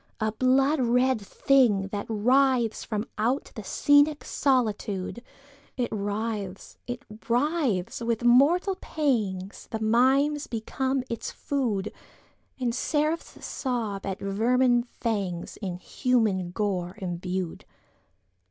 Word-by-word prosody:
A 215 Hz, -1 st, 0 dB
blood 265 Hz, +5 st, +3 dB
red 250 Hz, 0 st, +2 dB
thing 205 Hz, -3 st, +2 dB
that 205 Hz, 0 st, -4 dB
writhes 245 Hz, +1 st, +2 dB
from 215 Hz, 0 st, -3 dB
outThe 230 Hz, -1 st, -1 dB
scenic 290 Hz, +9 st, +3 dB
solitude! 220 Hz, -5 st, 0 dB, 0.6 s
It 245 Hz, -2 st, 0 dB
writhes!—it 210 Hz, +2 st, -4 dB, 0.2 s
writhes!—with 235 Hz, -, 0 dB
mortal 295 Hz, +11 st, +4 dB
pangsThe 220 Hz, -, -2 dB
mimes 265 Hz, +7 st, +3 dB
become 260 Hz, +3 st, -2 dB
its 230 Hz, -3 st, -4 dB
food, 225 Hz, -8 st, -2 dB, 0.7 s
And 245 Hz, -2 st, 0 dB
seraphs 305 Hz, +5 st, -1 dB
sob 225 Hz, -7 st, -3 dB
at 195 Hz, -1 st, -3 dB
vermin 240 Hz, +5 st, +2 dB
fangsIn 190 Hz, -5 st, -4 dB
human 215 Hz, -7 st, 0 dB
gore 185 Hz, -2 st, -2 dB
imbued. 180 Hz, -2 st, -4 dB
230 Hz, 90 wpm, -27 LUFS, 200-260 Hz, 0.7 s, mortal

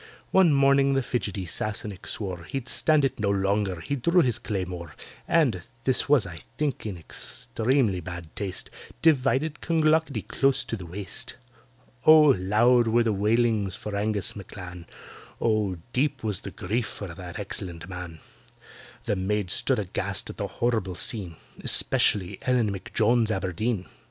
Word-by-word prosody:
One 190 Hz, -4 st, +6 dB
morning 140 Hz, 0 st, +4 dB
the 135 Hz, -, +1 dB
fidgety 100 Hz, -6 st, -2 dB
Sassenach 105 Hz, +2 st, -4 dB
swore 90 Hz, -5 st, -4 dB
He'd 130 Hz, +5 st, -4 dB
stand 155 Hz, -3 st, +2 dB
it 135 Hz, -, -2 dB
no 105 Hz, -1 st, +1 dB
longer—he 100 Hz, -, 0 dB
drew 170 Hz, +8 st, +4 dB
his 120 Hz, -2 st, 0 dB
claymore, 90 Hz, -8 st, -4 dB, 0.3 s
And 135 Hz, -, +3 dB, 0.2 s
(this 130 Hz, +1 st, +1 dB
was, 145 Hz, -6 st, +5 dB
I 80 Hz, -2 st, -8 dB, 0.2 s
think, 145 Hz, -7 st, -1 dB
in 100 Hz, -4 st, -5 dB
extremely 110 Hz, -, -1 dB
bad 85 Hz, -2 st, -8 dB
taste) 95 Hz, -3 st, -4 dB, 0.3 s
Divided 145 Hz, 0 st, +2 dB
CLONGLOCKETTY 160 Hz, -, +2 dB
close 135 Hz, +2 st, +2 dB
to -, -, -3 dB
the 95 Hz, -5 st, -8 dB
waist. 95 Hz, +3 st, -6 dB, 0.7 s
Oh! 155 Hz, -2 st, +8 dB
loud 115 Hz, +6 st, +3 dB
were 115 Hz, +1 st, +3 dB
the 110 Hz, -2 st, +1 dB
wailings 105 Hz, -1 st, +1 dB
for 105 Hz, -1 st, -5 dB
ANGUS 105 Hz, -2 st, -1 dB
M'CLAN, 90 Hz, -4 st, -9 dB, 0.5 s
Oh! 110 Hz, -5 st, +1 dB, 0.2 s
deep 135 Hz, 0 st, 0 dB
was 105 Hz, -4 st, +1 dB
the -, -, -7 dB
grief 115 Hz, +5 st, -2 dB
for 95 Hz, -5 st, -7 dB
that 90 Hz, +2 st, -8 dB
excellent 90 Hz, -4 st, -6 dB
man; 90 Hz, -3 st, -8 dB, 0.8 s
The -, -, 0 dB
maids 95 Hz, 0 st, -1 dB
stood -, -, +1 dB
aghast -, -, -2 dB
at -, -, -15 dB
the -, -, -2 dB
horrible 110 Hz, -6 st, -1 dB
scene— 95 Hz, -4 st, +1 dB, 0.3 s
Especially 95 Hz, -4 st, +2 dB
ELLEN 120 Hz, -5 st, +2 dB
M'JONES 110 Hz, +4 st, +1 dB
ABERDEEN. 95 Hz, +1 st, -1 dB
105 Hz, 145 wpm, -26 LUFS, 95-130 Hz, 0.8 s, Oh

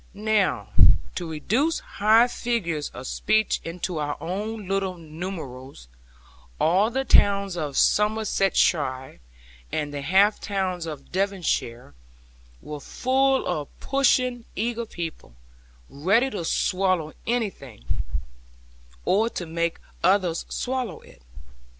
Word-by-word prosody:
Now, 215 Hz, -1 st, +1 dB, 0.4 s
to 175 Hz, -2 st, -4 dB
reduce 235 Hz, -, +1 dB
high 220 Hz, +4 st, +4 dB
figures 200 Hz, -12 st, -2 dB
of 125 Hz, -, -9 dB
speech 215 Hz, +9 st, +1 dB
into 175 Hz, 0 st, -4 dB
our 145 Hz, -1 st, -2 dB
own 205 Hz, +3 st, -4 dB
little 195 Hz, -1 st, -1 dB
numerals, 155 Hz, -, -7 dB, 0.7 s
all 190 Hz, +7 st, +3 dB
the 265 Hz, +3 st, -1 dB
towns 200 Hz, -5 st, +4 dB
of 150 Hz, -5 st, -3 dB
Somersetshire 195 Hz, -, +2 dB, 0.5 s
and 150 Hz, -1 st, -2 dB
half 190 Hz, +9 st, +3 dB
the -, -, -8 dB
towns 185 Hz, -4 st, -1 dB
of 150 Hz, -3 st, -8 dB
Devonshire 185 Hz, -11 st, -1 dB, 0.7 s
were 150 Hz, -1 st, -6 dB
full 265 Hz, -, +1 dB
of 155 Hz, -5 st, -2 dB
pushing 255 Hz, -3 st, +2 dB
eager 235 Hz, +1 st, -2 dB
people, 165 Hz, -, -7 dB, 0.5 s
ready 200 Hz, -, +2 dB
to 175 Hz, -5 st, -4 dB
swallow 185 Hz, -3 st, +1 dB
anything, 195 Hz, -, -3 dB, 1.2 s
or 220 Hz, +4 st, +3 dB
to 180 Hz, -, -5 dB
make 170 Hz, +1 st, -1 dB, 0.3 s
others 185 Hz, -4 st, +2 dB
swallow 250 Hz, -8 st, -3 dB
it. -, -, -18 dB
190 Hz, 105 wpm, -25 LUFS, 160-220 Hz, 1.2 s, high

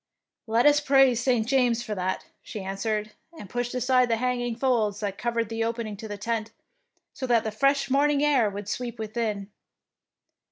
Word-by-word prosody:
"Let 230 Hz, +3 st, +2 dB
us 295 Hz, 0 st, +6 dB
praise 270 Hz, -4 st, +4 dB
St. 240 Hz, -3 st, +2 dB
James 240 Hz, -2 st, +2 dB
for 215 Hz, -, -4 dB
that," 185 Hz, -1 st, -2 dB, 0.2 s
she 210 Hz, -, -7 dB
answered, 210 Hz, +2 st, -2 dB, 0.3 s
and 205 Hz, -, -9 dB
pushed 245 Hz, +4 st, -3 dB
aside 250 Hz, 0 st, +3 dB
the 230 Hz, -, +3 dB
hanging 245 Hz, 0 st, -1 dB
folds 225 Hz, -5 st, +1 dB
that 200 Hz, -2 st, -3 dB
covered 235 Hz, -1 st, -1 dB
the 225 Hz, +1 st, -2 dB
opening 230 Hz, -2 st, -3 dB
to 220 Hz, -, -7 dB
the 205 Hz, -1 st, -6 dB
tent, 220 Hz, +1 st, -2 dB, 0.6 s
so 260 Hz, -, -5 dB
that 235 Hz, -2 st, +3 dB
the 220 Hz, -, -3 dB
fresh 275 Hz, +5 st, +2 dB
morning 285 Hz, +2 st, +2 dB
air 265 Hz, -8 st, +3 dB
would 200 Hz, 0 st, -7 dB
sweep 240 Hz, +2 st, -4 dB
within. 215 Hz, -2 st, -3 dB
230 Hz, 175 wpm, -26 LUFS, 215-250 Hz, 0.6 s, us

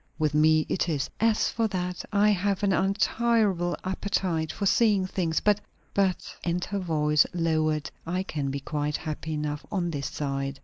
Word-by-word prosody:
"With 155 Hz, -2 st, +1 dB
me 155 Hz, +1 st, +4 dB
it 180 Hz, -, 0 dB
is." 145 Hz, -4 st, -1 dB
"As 225 Hz, 0 st, +3 dB
for 230 Hz, -1 st, +1 dB
that, 180 Hz, -3 st, -3 dB
I 205 Hz, +1 st, +4 dB
have 200 Hz, 0 st, 0 dB
an 195 Hz, -1 st, +3 dB
untirable 195 Hz, -1 st, +1 dB
appetite 185 Hz, -4 st, -1 dB
for 200 Hz, -, -3 dB
seeing 205 Hz, -2 st, +3 dB
things. 170 Hz, -4 st, 0 dB
But 210 Hz, -1 st, +2 dB, 0.3 s
but," 195 Hz, -2 st, 0 dB
and 175 Hz, +1 st, -1 dB
her 200 Hz, -, -3 dB
voice 150 Hz, -4 st, +2 dB
lowered, 155 Hz, -3 st, 0 dB
"I 180 Hz, +3 st, -2 dB
can 145 Hz, -6 st, -3 dB
be 140 Hz, +1 st, -3 dB
quite 150 Hz, +1 st, -2 dB
happy 155 Hz, 0 st, -5 dB
enough 150 Hz, 0 st, -3 dB
on 175 Hz, -4 st, -1 dB
this 140 Hz, -3 st, -3 dB
side." 135 Hz, -1 st, -3 dB
175 Hz, 170 wpm, -27 LUFS, 150-200 Hz, 0.3 s, me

